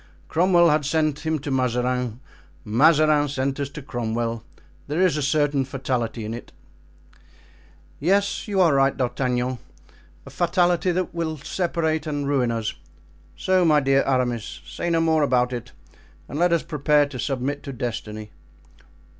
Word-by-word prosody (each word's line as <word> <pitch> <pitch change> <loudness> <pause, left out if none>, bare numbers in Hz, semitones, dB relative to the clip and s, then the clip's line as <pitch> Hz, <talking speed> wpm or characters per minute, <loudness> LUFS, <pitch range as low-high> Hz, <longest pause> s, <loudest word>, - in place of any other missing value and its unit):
Cromwell 175 0 +4
had 150 0 +2
sent 155 +1 0
him 160 0 +1
to 145 0 -5
Mazarin. 125 -2 0 0.5
Mazarin 150 +5 +4
sent 135 0 -2
us 140 -1 -2
to 145 0 -9
Cromwell. 115 -2 -3 0.5
There 150 +4 -2
is 185 -5 +3
a 150 - -1
certain 145 -1 +1
fatality 125 -4 -3
in 110 - -4
it." 120 - -9 1.5
"Yes, 200 +8 +1
you 200 -2 -1
are 170 -5 +5
right, 135 0 +3
D'Artagnan, 125 -1 -1 0.7
a - - -10
fatality 175 +1 +2
that 185 +1 -2
will 165 -2 -3
separate 160 0 -1
and 145 -2 -2
ruin 135 -4 +1
us! 115 -2 -2 0.6
So, 185 -1 +2
my 155 -3 +5
dear 135 -1 +3
Aramis, 125 -4 -1
say 175 - -4
no 165 -1 +2
more 160 -1 +2
about 125 -3 +2
it 120 -2 -6 0.6
and 145 - -5
let 175 0 +3
us 170 -2 +2
prepare 150 -2 +2
to 140 -3 -8
submit 135 +2 -2
to 140 - -7
destiny." 110 -3 -5
140 Hz, 150 wpm, -23 LUFS, 125-160 Hz, 1.5 s, are